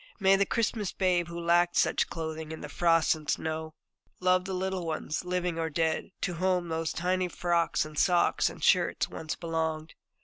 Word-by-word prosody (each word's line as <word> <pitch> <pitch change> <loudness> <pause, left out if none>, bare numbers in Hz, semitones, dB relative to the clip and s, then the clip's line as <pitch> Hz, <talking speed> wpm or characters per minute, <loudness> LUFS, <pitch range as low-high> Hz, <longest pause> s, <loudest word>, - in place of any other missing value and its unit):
May 195 -1 +5
the 195 0 +2
Christmas 220 -3 -1
Babe 180 -3 +1
who 170 0 -6
lacked 175 +1 +2
such - - +2
clothing 160 -1 -5
in 160 - -7
the 150 - -7
frost 165 +1 +3
and 155 -1 -8
snow, 160 0 -2 0.4
love 185 0 +2
the 190 - -4
little 190 0 -2
ones, 160 -1 -3
living 180 -2 -2
or 160 0 -1
dead, 160 +1 -1
to 180 - -1
whom 180 -2 +1
those 160 0 -1
tiny 180 +1 0
frocks 170 -2 0
and 155 -1 -5
socks 175 -2 +3
and - - -11
shirts - - +3
once 155 -1 -5
belonged! 160 -1 -3
170 Hz, 180 wpm, -29 LUFS, 160-180 Hz, 0.4 s, May